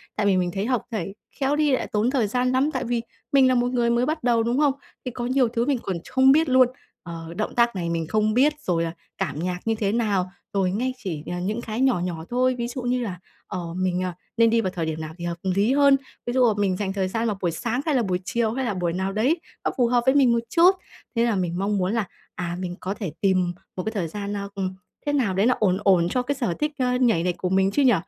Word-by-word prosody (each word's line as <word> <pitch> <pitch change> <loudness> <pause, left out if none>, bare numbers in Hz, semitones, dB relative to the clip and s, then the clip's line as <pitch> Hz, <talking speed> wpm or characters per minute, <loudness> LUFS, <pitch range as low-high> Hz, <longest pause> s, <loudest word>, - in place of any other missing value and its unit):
tại 210 - 0
vì 195 -2 +4
mình 175 -1 0
thấy 195 +1 -1
học 250 -1 +1
nhảy 205 -3 -3 0.3
khéo 275 +2 +2
đi 300 -2 +2
lại 260 - 0
tốn 215 +3 +2
thời 255 -5 +1
gian 250 +4 +1
lắm. 265 +4 +2
Tại 260 - -1
vì 235 -1 -1 0.3
mình 270 -2 +6
là 255 - +3
một 245 +1 +1
người 240 -2 +1
mới 240 +1 +2
bắt 310 +1 -2
đầu, 235 -2 +3
đúng 235 +2 0
hông? 290 -2 +4 0.3
Thì 250 - -3
có 240 +1 -4
nhiều 255 0 +3
thứ 230 +1 -1
mình 275 -1 +1
còn 185 - -2
ch - - -13
không 265 0 +5
biết 315 +2 +4
luôn, 255 -1 +6 0.4
ờ, 165 -1 -7
động 215 - -2
tác 235 -2 +3
này 170 -2 -2
mình 165 -1 -2
không 215 +3 +1
biết, 280 +6 +4
rồi 170 -2 0
là 165 - -2 0.3
cảm 145 +2 -2
nhạc 180 +1 -2
như 225 0 +1
thế 205 -2 0
nào. 205 -5 0 0.2
Rồi 190 -2 +1
ngay 250 +6 -1
chỉ, 175 -11 -5
ờ, 175 - -3
những 215 +5 -2
cái 225 +1 -4
nhỏ 260 -7 +3
nhỏ 170 -2 -4
thôi, 255 +1 +2
ví 235 -1 -2
dụ 250 +1 -5
như 250 +1 0
là, 185 -6 -5 0.3
ờ, 170 -2 -5
mình, 185 0 0
à, 180 -1 -2 0.2
nên 230 0 +5
đi 230 0 +3
vào 190 -4 -2
thời 170 -3 -3
điểm 160 0 -3
nào 155 0 -6
thì 175 - -6
hợp 170 0 -3
lý 200 +6 +2
hơn, 280 -1 +5 0.3
ví 240 - -2
dụ 255 0 +4
là 220 - +3
mình 195 -3 +1
dành 195 -2 -2
thời 190 -1 0
gian 225 +4 -1
vào 210 - -1
buổi 175 -2 +1
sáng 235 +10 -2
hay 305 -4 +1
là 245 - +3
buổi 185 -3 -1
chiều 230 +2 0
hay 265 +1 -2
là 225 - -1
buổi 175 -3 -1
nào 190 +2 -1
đấy 260 +11 +2 0.3
nó - - +2
phù 245 - +3
hợp 240 0 +2
với 265 +1 +4
mình 265 -4 +5
một 235 - +3
chút. 340 +8 +6 0.4
Thế 230 0 +3
là 230 -3 +1
mình 180 -1 -1
mong 200 +1 0
muốn 185 +2 0
là, 225 -5 0 0.3
à, 175 -1 -3
mình 180 -1 -4
có 190 - -3
thể 200 -6 -5
tìm 185 -3 +2 0.2
một 185 - -3
cái 220 - -2
thời 195 -7 -2
gian 200 +4 -5
nao 200 -1 -3
ừm, 190 -1 -3 0.3
thế 290 - 0
nào 240 -9 +1
đấy 195 +4 +2
nó 250 - +4
ổn 190 -3 +3
ổn 180 -4 +4
cho 250 - +1
cái 275 +3 -2
sở 240 -10 -1
thích, 300 0 0
ơ, 250 -1 +1
nhảy 180 -9 +2
của 180 - -2
mình 190 +1 +3
chứ 290 - +1
nhỉ. 255 -2 +6
215 Hz, 285 wpm, -24 LUFS, 185-250 Hz, 0.4 s, mình